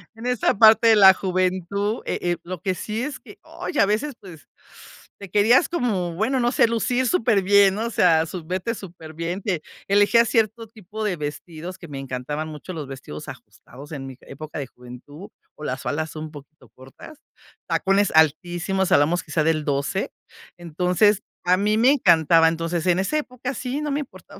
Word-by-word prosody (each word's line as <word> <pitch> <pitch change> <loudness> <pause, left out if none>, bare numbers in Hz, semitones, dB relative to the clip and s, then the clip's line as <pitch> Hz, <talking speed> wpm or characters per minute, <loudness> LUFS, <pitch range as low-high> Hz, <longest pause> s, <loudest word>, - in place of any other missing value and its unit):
en 225 - -10
esa 250 -5 +1
parte 220 +1 +7
de 220 - +7
la 190 -2 +8
juventud, 185 +3 -1
eh - - -2
eh, 175 -1 -1
lo 180 -2 -7
que 190 - -1
sí 215 +5 -4
es 280 -2 -5
que - - -15
oye, 290 - -3
a - - +5
veces, 225 +7 -1
pues 175 -6 -14 0.7
te 200 -2 -10
querías 215 - +4
como, 200 - -1
bueno, 245 +7 0
no 240 0 +1
sé, - - +4
lucir 245 +3 0
súper 220 -4 +2
bien, 200 0 +5
¿no? 220 +2 -2
O - - -3
sea, 160 -6 +3
sub 165 0 -8
verte 185 +6 -2
súper 170 -6 -11
bien. 170 +4 -4
Te 180 -6 -2 0.3
elegía 205 +4 +4
cierto 225 -1 0
tipo 215 0 -8
de 190 -4 0
vestidos 160 +4 -7
que 170 - -11
me 135 -1 -6
encantaban 135 +4 -5
mucho 155 +4 -9
los 150 -4 -6
vestidos 135 - -9
ajustados 140 +5 -13
en 135 -2 -6
mi 130 -1 -10
época 155 +2 -9
de 135 - -5
juventud, 125 +9 -13 0.3
o 150 - -12
las 130 +2 -3
faldas 155 +1 -3
un 155 0 -6
poquito 150 +1 -15
cortas, 135 - -15 0.5
tacones 195 +1 +2
altísimos, 175 +4 +1
hablamos 160 +5 +3
quizá 155 0 -1
del 155 -1 0
12. 145 +7 -2 0.5
Entonces, 180 +4 +1 0.2
a 180 +1 +4
mí 210 +2 +1
me 245 +4 +5
encantaba. 165 - +4
Entonces, 165 +1 -3
en 180 +1 +3
esa 250 +11 0
época 255 -2 -4
sí, 265 +3 -4
no 295 - -3
me 285 - -1
importaba. 195 -5 -13
185 Hz, 185 wpm, -23 LUFS, 160-220 Hz, 0.7 s, la